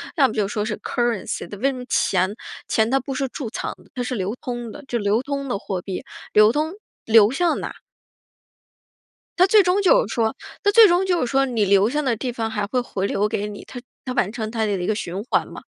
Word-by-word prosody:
要 280 -6 +5
么 220 - -5
就 210 -2 +1
说 210 +1 -2
是 210 0 -3
currency， 235 -7 -2
它 205 - -7
为 265 +7 +1
什 - - -6
么 250 -1 -7
钱 185 +2 +1 0.3
钱 220 +1 +1
它 270 - +3
不 265 +1 -5
是 270 +1 -1
贮 245 -2 -5
藏 230 - -4
的， - - -24
它 250 - -2
是 250 - -3
流 200 -1 -2
通 240 -2 -5
的， 295 - -10
就 240 - -1
流 210 +3 +1
通 280 0 -3
的 245 - -1
货 190 -2 -4
币。 190 0 -5 0.3
流 215 +1 +7
通， 310 +6 -1 0.3
流 220 -1 +6
向 340 +5 +1
哪？ - - -5 1.7
它 370 - +6
最 415 +1 +6
终 365 +3 +2
就 - - +4
是 - - -5
说 225 -2 0 0.3
它 410 - +4
最 450 +1 +8
终 355 +1 +2
就 360 -2 +1
是 250 - 0
说， 270 0 +3
你 235 -5 0
留 200 +2 +4
向 300 +4 -1
的 255 -4 +1
地 245 +3 -3
方 225 -2 -3
还 210 -2 -2
会 250 +4 0
回 195 -5 -3
流 205 +1 +1
给 210 -1 -2
你， 205 -1 -8
它 250 - -8 0.3
它 255 - -3
完 205 -6 +1
成 220 -2 -4
它 225 -1 0
的 210 - -1
一 180 -2 -2
个 215 - +2
循 190 -1 -4
环 - - +1
嘛。 - - -10
235 Hz, 290 characters per minute, -22 LUFS, 210-275 Hz, 1.7 s, 最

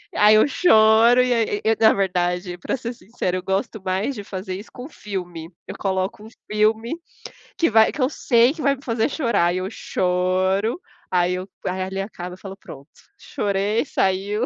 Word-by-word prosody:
Aí 210 +1 +6
eu 215 - +5
choro 230 -5 +5
e 250 0 +1
aí, 230 -2 +2
eh - - -9
eh, - - -6
na 220 -1 +6
verdade, 180 -2 -1
para 175 - -3
ser 235 0 -5
sincera, 200 -5 -4
eu 185 - -6
gosto 195 +4 -2
mais 190 +9 -1
de 205 - -7
fazer 190 -1 -6
isso 200 +4 -10
com 250 +3 -9
filme. 180 - -7 0.2
Eu - - -7
coloco 190 +1 -2
um 220 - -11 0.2
filme 220 +8 +1 0.6
que 330 - +2
vai 220 -1 +4
que 300 - -5
eu 255 - +2
sei 240 -4 +3
que 320 - -8
vai 280 -1 +2
me 270 - -17
fazer 230 -2 0
chorar, 235 - +1
e 185 - -1
eu 185 +1 -4
choro, 185 - 0 0.3
aí 180 0 +2
eu 185 +1 -6 0.2
aí 185 +1 -2
ali 190 +1 -4
acaba 180 -3 -7
e - - -8
eu - - -21
falo: 195 0 -9
"Pronto, 140 -6 -13 0.3
chorei, 205 +4 -1
saiu.". 200 -1 0
200 Hz, 200 wpm, -22 LUFS, 185-230 Hz, 0.6 s, Aí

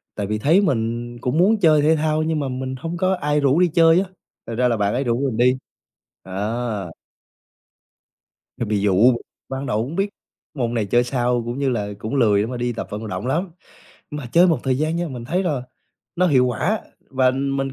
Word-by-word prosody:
tại 100 -2 -3
vì 105 0 -1
thấy 160 - +4
mình 120 - -1
cũng 130 +5 -1
muốn 205 +5 +4
chơi 155 -4 +5
thể 155 +2 +4
thao 155 0 0
nhưng 160 -1 0
mà 140 -2 -2
mình 130 +1 -4
hông 165 +3 -4
có 185 +1 +1
ai 150 -2 0
rủ 140 +3 +3
đi 180 - +5
chơi 165 0 +5
á, 195 - 0 0.4
thành 115 - -4
ra 125 +1 +2
là 115 -2 +1
bạn 100 0 0
ấy 130 +3 0
rủ 120 -1 0
mình 115 - -4
đi, 125 +2 +3 0.7
đó. 105 0 -3 1.7
Ờ, 120 - -2
bị 105 -1 0
dụ, 105 +5 +4 0.4
ban 135 +1 -4
đầu 110 -1 0
hông 145 +7 -6
biết 195 +2 0 0.4
môn 120 -5 -2
này 115 -3 0
chơi 120 +5 +3
sao 120 -1 0
cũng 120 +3 -4
như 140 - +1
là 105 -5 -1
cũng 110 +6 -4
lười 105 -6 +3
để - - 0
mà 125 +1 -5
đi 120 0 -1
tập - - -5
vận 105 +1 -5
động 120 - -4
lắm, 170 +7 -1 0.6
mà 150 -3 -5
chơi 175 +2 +6
một 160 -7 +2
thời 130 -1 0
gian 155 +2 0
nha, 175 -1 -2
mình 125 -3 -7
thấy 180 +8 0
là 150 -9 -1 0.5
nó 180 +1 +3
hiệu 130 -6 +4
quả 180 - 0 0.3
và 130 -1 +3
mình 135 0 -2
130 Hz, 220 wpm, -21 LUFS, 120-155 Hz, 1.7 s, chơi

